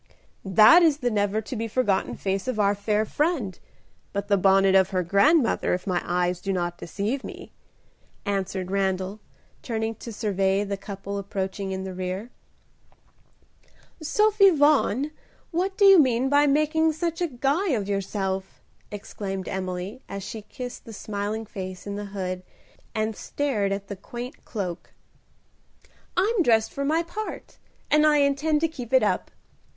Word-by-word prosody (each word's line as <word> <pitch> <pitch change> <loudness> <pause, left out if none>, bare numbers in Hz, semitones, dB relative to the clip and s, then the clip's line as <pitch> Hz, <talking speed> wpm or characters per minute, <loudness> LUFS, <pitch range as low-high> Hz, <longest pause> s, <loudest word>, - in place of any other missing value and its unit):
"That 215 - +7
is 315 -4 +4
the 245 -4 -1
never 205 0 +1
to 250 +4 -7
be 225 0 -2
forgotten 215 -4 0
face 195 +3 -2
of 250 -4 -2
our 200 -1 +4
fair 210 +1 0
friend, 275 - -1 0.5
but 200 +1 -3
the 200 - +5
bonnet 195 0 +4
of 190 -1 +5
her 185 -1 0
grandmother, 230 - +3
if 180 - -7
my 180 -3 0
eyes 180 0 0
do 195 - -2
not 175 -2 -2
deceive 215 +10 -3
me," - - -9 0.7
answered 190 -2 -2
Randal, 190 +1 -1 0.4
turning 225 -1 -2
to 230 +1 -9
survey 195 -2 0
the 200 -1 -3
couple 200 0 -6
approaching 195 0 -4
in 190 0 -3
the 190 -1 -5
rear. 185 +5 -4 1.7
"Sophie 420 +5 +4
Vaughan, 290 - +3 0.4
what 375 +3 -1
do 405 - +5
you 390 -2 +9
mean 260 -2 +3
by 290 +1 +4
making 310 +2 +2
such 335 +2 -3
a 350 - +2
guy 285 +7 0
of 215 -9 0
yourself?" 195 -1 -3 0.3
exclaimed 195 -2 -6
Emily, 190 +4 -4
as 200 0 -5
she 220 +3 -6
kissed 245 +4 -8
the 225 - -9
smiling 210 +2 -4
face 185 -2 -7
in 200 0 -4
the 205 0 -5
hood 185 -2 -4 0.5
and 215 0 -1
stared 220 -9 -1
at 195 0 -3
the 200 - -5
quaint 240 +6 -8
cloak. 185 -6 -5 1.2
"I'm 410 +3 +3
dressed 225 -7 +3
for 280 - -3
my 315 +4 +1
part, 425 +6 -7 0.3
and 300 0 +5
I 300 -1 +5
intend 290 +2 +2
to 330 - +3
keep 260 -7 -8
it 260 - +6
up. - - 0
210 Hz, 155 wpm, -25 LUFS, 195-280 Hz, 1.7 s, you